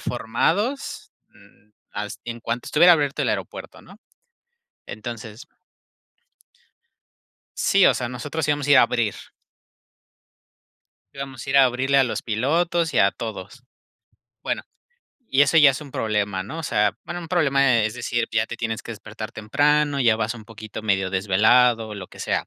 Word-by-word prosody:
formados, 165 - -2 0.2
mm, 105 - -23 0.2
has 105 0 -5
en 120 0 -6
cuanto 115 +1 -4
estuviera 175 +3 +6
abierto 145 -3 -1
el - - 0
aeropuerto, - - -5
¿no? - - -17 0.9
Entonces 110 +3 -8 2.1
sí, 195 -2 +4
o - - +4
sea, 125 - -3
nosotros 145 +5 -4
íbamos 145 -1 -1
ir 145 - +7
a - - +8
abrir 115 -3 0 2.0
íbamos 135 -2 -8
ir 140 0 0
a 135 - +8
abrirle 130 +2 +1
a 135 - +5
los 125 - -3
pilotos 160 +9 0
y - - +2
a 100 - +5
todos. 110 +3 -8 0.8
Bueno, - - -2 0.7
y 135 +2 +4
eso 155 +3 +2
ya 145 -3 +8
es 130 - -5
un 145 -2 -11
problema, 105 -3 -1
¿no? 110 +12 -8
O - - -5
sea, 105 -8 +1
bueno, 175 0 -6
un 165 - -9
problema, 140 -7 +3
es 110 - -2
decir, 120 -1 -2
ya 110 - +1
tienes 115 -2 -4
que 115 - -7
despertar 110 +1 -9
temprano, 145 +6 +1
ya 115 -4 +4
vas 115 +1 -2
un 110 - -11
poquito 110 0 -9
medio 95 -3 0
desvelado, 110 +4 +3
lo 95 -3 -8
que - - -16
sea. - - -2
120 Hz, 155 wpm, -23 LUFS, 110-145 Hz, 2.1 s, a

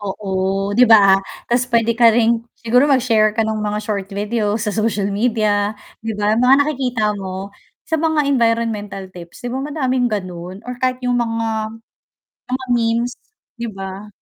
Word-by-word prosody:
Oo, 205 +1 -6 0.5
'di 250 - +6
ba? 220 - +10 0.5
'Tas 245 +1 +2
pwede 230 0 +3
ka 235 -1 +7
rin 235 0 +3 0.2
siguro 250 +5 +2
mag-share 230 -5 +3
ka 225 - +2
nung 220 -1 -2
mga 210 0 -2
short 200 -3 -3
video 210 +1 -1
sa 210 -2 -2
social 210 -2 0
media 210 -1 +1 0.3
'di 225 0 -3
ba, 210 0 +1
mga 250 +2 +6
nakikita 255 -6 -2 0.2
mo 190 +1 -6 0.3
sa 320 - -1
mga 315 -2 +2
environmental 230 -6 0
tips 175 +3 -12
'di 245 - -2
ba, 260 - -2
madaming 260 -4 0
ganun 185 -1 -5
or 250 0 -6
kahit 255 -1 +1
yung 245 0 +1
mga 225 -1 -2 0.7
mga 260 +1 -3
memes, 235 0 +1 0.5
'di 235 - -3
ba? 195 +1 -7
225 Hz, 160 wpm, -19 LUFS, 205-245 Hz, 0.7 s, ba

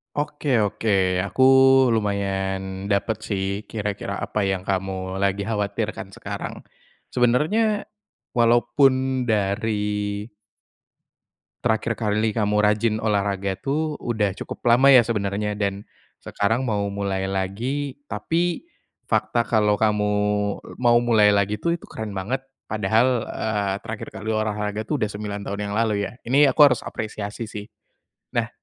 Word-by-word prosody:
Oke 150 0 -3 0.2
oke, 105 +2 -2 0.4
aku 100 +7 -2 0.5
lumayan 95 -2 -2
dapat 105 +2 +1
sih 100 0 -2
kira-kira 105 -2 -4
apa 105 - -2
yang 95 -1 -1
kamu 95 -1 -3
lagi 100 0 0
khawatirkan 105 -2 -2
sekarang - - -6 0.5
sebenarnya 190 - +2 0.5
walaupun 130 +2 +3
dari 105 -1 -1 1.4
terakhir 115 0 +1
kali 110 0 +1
kamu 105 -1 +1
rajin 105 +1 +2
olahraga 100 -2 0
tuh 150 +3 -2
udah 110 -4 0
cukup - - -7
lama 135 +4 +6
ya 125 - +9
sebenarnya 105 -2 -2
dan 100 -1 -1 0.4
sekarang 110 +4 0
mau 105 -4 0
mulai 100 -1 -2
lagi, 115 +10 -3
tapi 165 +11 -1 0.5
fakta 120 - +1
kalau 105 -2 +2
kamu 105 -1 +1 0.7
mau 120 -1 +4
mulai 110 -3 +4
lagi 100 +1 +1
tuh 170 0 0
itu - - -13
keren 110 -2 -6
banget 125 +8 -3 0.2
padahal, 110 +3 +2
eee, 105 -3 -2
terakhir 110 -1 -6
kali 110 - -4
olahraga 105 -1 -1
tuh 150 -4 -2
udah 105 - +1
9 105 0 -5
tahun 100 0 -3
yang - - -3
lalu 110 -2 +2
ya, - - -6 0.2
ini 145 +3 +6
aku 140 - 0
harus - - -6
apresiasi 105 +1 -5
sih. 105 -2 -7 0.7
Nah 115 -1 0
105 Hz, 130 wpm, -23 LUFS, 100-120 Hz, 1.4 s, ya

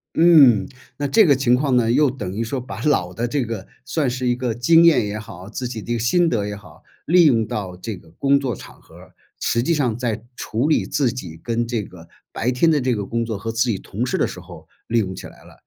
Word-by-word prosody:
嗯。 140 - +6 0.3
那 145 - -1
这 215 +10 +5
个 140 -5 +4
情 125 -2 +2
况 130 -1 +1
呢， 115 -2 +2
又 140 +2 +3
等 105 -8 -6
于 110 +3 -3
说 130 +3 -3
把 125 - -8
老 90 -12 +1
的 120 +5 -2
这 135 -1 -1
个， 110 -4 -6 0.2
算 150 -5 -1
是 130 +1 -3
一 120 - +2
个 125 -2 -2
经 165 +8 +5
验 150 -10 +5
也 105 +1 -4
好、 95 -2 -10
自 125 +3 -5
己 115 -4 -6
的 120 - -4
一 - - +1
个 - - -1
心 170 +10 +2
得 105 -6 -1
也 105 0 -5
好， 90 -6 -16 0.2
利 175 +1 +5
用 115 -6 +3
到 95 -4 -5
这 100 +2 -6
个 80 -2 -17
工 140 +10 +2
作 130 -5 -2
场 - - -13
合 - - -19
儿， - - -16 0.3
实 115 - 0
际 170 - +1
上 125 -7 0
在 115 -3 -3
处 120 +7 -2
理 155 - +2
自 135 -4 0
己 85 -10 -8
跟 115 0 -1
这 115 -3 -2
个 85 -3 -14 0.2
白 115 +2 -1
天 130 +7 +2
的 150 -3 +2
这 125 -1 0
个 100 -2 -3
工 115 0 -2
作 110 -3 -4
和 115 +3 -4
自 115 +1 +1
己 100 - -1
同 115 +6 -4
事 - - -1
的 - - +2
时 - - -8
候 - - -13 0.2
利 115 0 +2
用 95 -4 -1
起 - - -9
来 - - -15
了。 - - -19
120 Hz, 285 characters per minute, -21 LUFS, 105-135 Hz, 0.3 s, 嗯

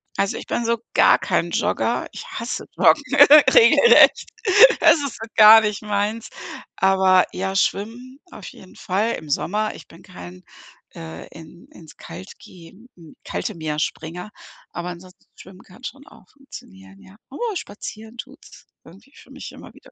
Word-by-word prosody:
Also, 195 - -2
ich - - -10
bin 235 - -3
so 235 0 0 0.2
gar - - +4
kein - - -2
Jogger. - - -2
Ich - - -10
hasse - - -6
Joggen - - +3 0.5
regelrecht. 475 0 +5 0.5
Das 330 -1 +5
ist 280 -3 -5
so 225 - -9
gar 220 0 +8
nicht 210 -1 -3
meins. 210 +2 -3 0.5
Aber 190 -1 +2
ja, 190 +1 -4
schwimmen 235 +7 -3
auf 195 - -12
jeden 185 - -15
Fall 205 +5 -2
im 155 - -9
Sommer. 210 +8 -2
Ich - - -14
bin 165 - -18
kein, 90 0 -13 0.5
äh, 80 0 -10
in 165 +2 -16
ins 160 -3 -17
Kalt 175 +3 -12
geh 170 -3 -16 0.5
kalte 215 - -5
Meer 155 -2 -5
Springer, 175 +6 -6 0.4
aber 175 +1 -7
ansonsten 180 +1 -13
schwimmen 185 0 -16
kann 195 +7 -20
schon 280 +1 -10
auch 190 - -20
funktionieren, 95 - -15
ja. 190 - -18
Aber 440 - -5
spazieren 220 - -10
tut's 270 +5 -14 0.2
irgendwie 200 - -19
für - - -19
mich - - -10
immer - - -15
wieder. - - -20
195 Hz, 155 wpm, -20 LUFS, 175-230 Hz, 0.5 s, gar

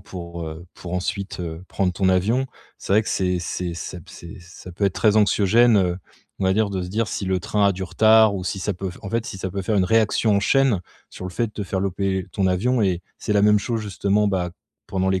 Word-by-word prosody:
pour, 85 -3 -8
heu 80 +3 -9
pour 90 0 -7
ensuite, 95 +1 -3
heu, 85 0 -5
prendre 95 -2 0
ton 95 +1 +1
avion, 110 +9 +2 0.3
c'est 95 - -1
vrai 110 - +5
que - - -6
c'est 90 -1 0
c'est 85 0 -4
ça 90 +1 -6
c'est 85 +5 -11
ça 85 +1 -12
peut 100 +4 -2
être 95 - -2
très 110 -1 +3
anxiogène, 110 +2 +4
heu, 90 -2 +1 0.4
on - - -1
va 95 0 +3
dire, 110 -2 +1
de 95 -2 -2
se 90 - -5
dire, 110 +3 -1
si 95 - -3
le 95 0 +1
train 105 +2 +1
a 100 - +3
du 95 0 -6
retard 110 +1 +5
ou 95 - -4
si 95 +2 -3
ça 105 +3 -1
peut 95 0 -5
en 100 - -6
fait 115 0 -1
si - - -6
ça 95 0 -4
peut 100 +2 -3
faire 105 +2 0
une 95 - +3
réaction 110 0 +2
en - - +2
chaîne 130 -4 +3 0.3
sur 95 - -9
le - - -6
fait 115 +4 -1
de - - -19
te 105 - -4
faire 95 0 -3
louper 95 -1 -1
ton 95 -2 +1
avion. 115 +7 +1
Et 90 -4 +1 0.2
c'est 105 - -2
la 100 - +4
même 105 0 +5
chose, 115 +1 -2
justement, 100 +1 +1
bah 90 -3 -1 0.4
pendant 95 0 -1
les 95 -1 +1
95 Hz, 255 wpm, -22 LUFS, 90-105 Hz, 0.4 s, vrai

